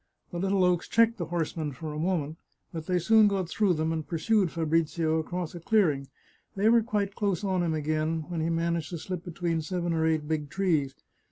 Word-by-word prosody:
The 175 Hz, -, -4 dB
little 195 Hz, 0 st, +2 dB
oaks 180 Hz, -1 st, +2 dB
checked 230 Hz, -1 st, +3 dB
the 170 Hz, -, -3 dB
horsemen 160 Hz, -3 st, -2 dB
for 155 Hz, +3 st, -6 dB
a 150 Hz, -, -4 dB
moment, 160 Hz, -3 st, -1 dB, 0.3 s
but 160 Hz, -1 st, -6 dB
they 180 Hz, -, +2 dB
soon 215 Hz, +5 st, +5 dB
got 195 Hz, -3 st, 0 dB
through 195 Hz, 0 st, +1 dB
them 160 Hz, +1 st, 0 dB
and 160 Hz, -1 st, -2 dB
pursued 190 Hz, +3 st, +1 dB
Fabrizio 160 Hz, 0 st, 0 dB
across 175 Hz, +1 st, -4 dB
a 175 Hz, -, -7 dB
clearing. 165 Hz, -8 st, +2 dB, 0.5 s
They 205 Hz, +3 st, +3 dB
were 235 Hz, 0 st, +5 dB
quite 205 Hz, -3 st, -1 dB
close 200 Hz, -2 st, -1 dB
on 190 Hz, -2 st, +1 dB
him 165 Hz, -2 st, 0 dB
again 155 Hz, +1 st, -1 dB
when 170 Hz, -2 st, -3 dB
he 160 Hz, -, 0 dB
managed 165 Hz, -1 st, -1 dB
to 175 Hz, -, -4 dB
slip 180 Hz, +1 st, -5 dB
between 170 Hz, -1 st, -2 dB
seven 175 Hz, +1 st, -2 dB
or 160 Hz, 0 st, +1 dB
eight 155 Hz, -2 st, 0 dB
big 150 Hz, -2 st, -2 dB
trees. 155 Hz, -7 st, 0 dB
170 Hz, 205 wpm, -28 LUFS, 160-190 Hz, 0.5 s, soon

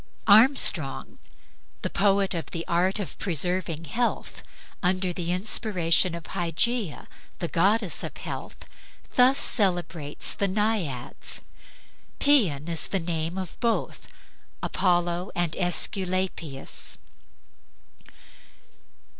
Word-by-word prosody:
Armstrong, 215 Hz, -, +4 dB, 0.6 s
the -, -, -1 dB
poet 195 Hz, 0 st, +1 dB
of 165 Hz, -5 st, -4 dB
the 165 Hz, 0 st, -5 dB
"Art 180 Hz, +4 st, +1 dB
of 200 Hz, -4 st, -7 dB
preserving 175 Hz, -1 st, -2 dB
Health," 240 Hz, +7 st, -3 dB, 0.4 s
under 185 Hz, 0 st, 0 dB
the 175 Hz, -1 st, -3 dB
inspiration 180 Hz, -3 st, +2 dB
of 170 Hz, -, -9 dB
Hygeia, 175 Hz, +3 st, -1 dB, 0.3 s
the 170 Hz, -, -3 dB
goddess 195 Hz, +4 st, +2 dB
of -, -, -6 dB
health, -, -, -7 dB, 0.6 s
thus 255 Hz, +2 st, +5 dB
celebrates 175 Hz, -, +2 dB
the 200 Hz, -, -1 dB
Naiads. 195 Hz, -, -2 dB, 0.8 s
Paeon 185 Hz, -, +3 dB
is 165 Hz, -1 st, 0 dB
a 195 Hz, -, +1 dB
name 165 Hz, -1 st, -3 dB, 0.2 s
both 235 Hz, -2 st, -2 dB
of -, -, -18 dB, 0.5 s
Apollo 175 Hz, 0 st, 0 dB
and 175 Hz, -2 st, -1 dB
Aesculapius. 180 Hz, -5 st, 0 dB
180 Hz, 95 wpm, -25 LUFS, 165-200 Hz, 0.8 s, thus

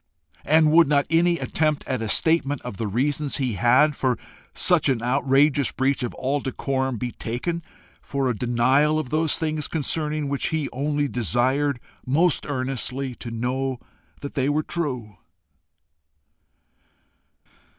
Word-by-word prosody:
And 155 Hz, 0 st, +4 dB
would 165 Hz, 0 st, +6 dB
not 140 Hz, -1 st, +2 dB
any 170 Hz, +1 st, +3 dB
attempt 155 Hz, -3 st, -1 dB
at 130 Hz, -3 st, -2 dB
a 110 Hz, -, -3 dB
statement 145 Hz, +3 st, +2 dB
of 125 Hz, -6 st, -7 dB
the 110 Hz, -, -2 dB
reasons 140 Hz, +7 st, -1 dB
he 130 Hz, -5 st, -1 dB
had 125 Hz, +8 st, +3 dB
for 130 Hz, -3 st, 0 dB, 0.3 s
such -, -, +3 dB
an 120 Hz, -3 st, 0 dB
outrageous 135 Hz, +2 st, +2 dB
breach 135 Hz, +1 st, 0 dB
of 120 Hz, -, -3 dB
all 140 Hz, +3 st, -1 dB
decorum 130 Hz, -1 st, -2 dB
be 125 Hz, +2 st, -3 dB
taken 145 Hz, +12 st, -4 dB, 0.4 s
for 140 Hz, -1 st, -2 dB
a 125 Hz, -, 0 dB
denial 130 Hz, +6 st, +2 dB
of 155 Hz, -5 st, -3 dB
those 155 Hz, 0 st, +1 dB
things 155 Hz, -2 st, -2 dB
concerning 155 Hz, -1 st, -1 dB
which 140 Hz, -1 st, -1 dB
he 160 Hz, -3 st, -1 dB
only 145 Hz, +2 st, 0 dB
desired 130 Hz, -, +1 dB, 0.2 s
most 155 Hz, +6 st, +1 dB
earnestly 130 Hz, 0 st, -3 dB
to 120 Hz, -, -8 dB
know 125 Hz, +3 st, -2 dB, 0.4 s
that 140 Hz, -, -6 dB
they 135 Hz, 0 st, 0 dB
were 150 Hz, +1 st, +1 dB
true. 125 Hz, -, -4 dB
135 Hz, 140 wpm, -24 LUFS, 125-150 Hz, 0.4 s, would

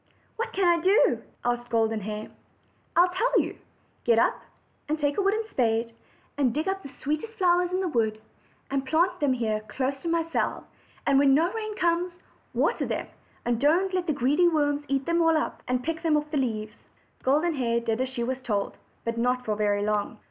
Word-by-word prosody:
"What 465 Hz, -, -3 dB
can 385 Hz, -, +1 dB
I 340 Hz, -1 st, +4 dB
do?" 385 Hz, +6 st, +4 dB, 0.2 s
asked 240 Hz, 0 st, -1 dB
Golden 225 Hz, -1 st, +1 dB
Hair. 210 Hz, +1 st, -5 dB, 0.6 s
"I 345 Hz, -, +7 dB
will 360 Hz, -, +4 dB
tell 410 Hz, +8 st, +2 dB
you. -, -, -3 dB, 0.4 s
Get 235 Hz, -1 st, +4 dB
up -, -, +2 dB, 0.5 s
and 310 Hz, -, +1 dB
take 290 Hz, +2 st, 0 dB
a -, -, +4 dB
wooden 430 Hz, +3 st, +1 dB
spade, 230 Hz, -1 st, +1 dB, 0.5 s
and 255 Hz, -5 st, +2 dB
dig 310 Hz, +4 st, -1 dB
up 385 Hz, 0 st, -1 dB
the 275 Hz, -, -9 dB
sweetest 305 Hz, +10 st, -4 dB
flowers 355 Hz, -1 st, +3 dB
in 370 Hz, +1 st, 0 dB
the 375 Hz, -, 0 dB
wood, 220 Hz, -7 st, 0 dB, 0.5 s
and 275 Hz, -1 st, 0 dB
plant 325 Hz, +7 st, +1 dB
them 285 Hz, -3 st, +2 dB
here 220 Hz, -4 st, 0 dB
close 265 Hz, +5 st, -1 dB
to 340 Hz, -, -6 dB
my 335 Hz, 0 st, +2 dB
cell; -, -, -1 dB, 0.4 s
and 275 Hz, -1 st, +4 dB
when 275 Hz, -1 st, +5 dB
no 335 Hz, +5 st, +2 dB
rain 435 Hz, -1 st, -4 dB
comes, 345 Hz, +1 st, +1 dB, 0.4 s
water -, -, +1 dB
them, -, -, -3 dB, 0.4 s
and 240 Hz, 0 st, 0 dB
don't 350 Hz, +7 st, +3 dB
let 365 Hz, -1 st, -1 dB
the -, -, +2 dB
greedy 285 Hz, +6 st, +3 dB
worms 290 Hz, -3 st, +1 dB
eat 275 Hz, 0 st, 0 dB
them 340 Hz, 0 st, +2 dB
all 325 Hz, -1 st, +4 dB
up, 310 Hz, -, -3 dB
but 250 Hz, 0 st, 0 dB
pick 320 Hz, +2 st, -3 dB
them 320 Hz, -3 st, +3 dB
off 300 Hz, 0 st, -3 dB
the 300 Hz, -, 0 dB
leaves." 215 Hz, -5 st, -2 dB, 0.5 s
Golden 305 Hz, +6 st, +2 dB
Hair 235 Hz, -4 st, 0 dB
did 230 Hz, +1 st, -1 dB
as 260 Hz, -, -1 dB
she 250 Hz, -2 st, -3 dB
was 260 Hz, +2 st, -2 dB
told, 210 Hz, -5 st, -2 dB, 0.3 s
but 230 Hz, 0 st, -2 dB
not 250 Hz, +1 st, +1 dB
for 215 Hz, -, 0 dB
very 205 Hz, -1 st, +1 dB
long. 210 Hz, +2 st, -1 dB
280 Hz, 205 wpm, -27 LUFS, 235-340 Hz, 0.6 s, I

